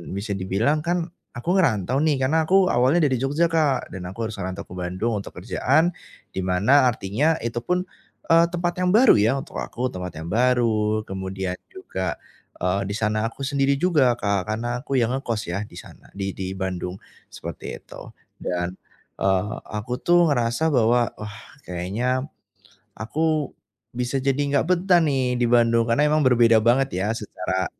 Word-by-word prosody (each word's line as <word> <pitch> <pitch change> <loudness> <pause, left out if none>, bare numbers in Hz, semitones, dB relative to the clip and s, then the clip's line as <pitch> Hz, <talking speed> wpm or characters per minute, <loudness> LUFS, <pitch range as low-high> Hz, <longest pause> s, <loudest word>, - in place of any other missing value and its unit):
bisa 100 +1 -4
dibilang, 105 +11 +1
kan, 170 +1 -1 0.3
aku 120 +8 -5
ngerantau, 125 - +2
nih. 155 -1 +2
Karena 155 +4 +2
aku 190 0 +4
awalnya 130 +8 +3
dari 130 - +2
Jogja, 145 +6 +1
Kak, 150 -6 +1
dan 90 -2 -6
aku 110 +4 -4
harus 110 - -6
ngerantau 95 -1 -4
ke - - -11
Bandung 90 +6 -2
untuk 100 - -10
kerjaan. 140 - +1 0.4
Di - - -4
mana, 100 +10 +4
artinya, 120 +8 +1
itu 120 0 -2
pun, 180 +8 -1 0.5
eee, 165 +1 +7
tempat 175 0 -1
yang 180 0 +2
baru, 245 +1 +7
ya, 110 +3 +3
untuk 145 - -7
aku. 125 +1 -3
Tempat 90 0 -5
yang - - -7
baru. 110 -2 +2
Kemudian 95 -1 -4 0.2
juga, 90 -4 -4 0.4
eee, 90 +2 0
di 100 - -2
sana 110 0 0
aku 135 +4 -6
sendiri 140 0 +1
juga, 145 -8 +3
Kak. 100 -2 -1
Karena 120 +3 -2
aku 135 -1 -2
yang 120 0 +2
ngekos, 115 -6 -2
ya, 100 +3 -2
di 85 -4 -13
sana - - -13
di 100 -1 -3
di 95 -1 -5
Bandung, 90 -1 -3 0.3
seperti - - -7
itu. - - -12 0.4
Dan, 90 0 -2 0.5
eee, 95 +2 +1 0.2
aku 110 +4 -4
tuh 175 -1 +4
ngerasa 135 +3 +1
bahwa 120 0 +3
wah, 105 -1 -8 0.3
kayaknya 110 +9 -2 0.7
aku 155 +6 -1 0.4
bisa 125 +2 -1
jadi 135 -1 +1
enggak 140 +2 +1
betah, 180 0 +4
nih, 130 -4 +1
di 120 - +3
Bandung, 115 -1 +4
karena 145 +6 +3
emang 155 0 +3
berbeda 115 -2 +5
banget, 130 +4 +3
ya, 100 +3 0
secara 95 -3 -3
120 Hz, 170 wpm, -23 LUFS, 100-145 Hz, 0.7 s, eee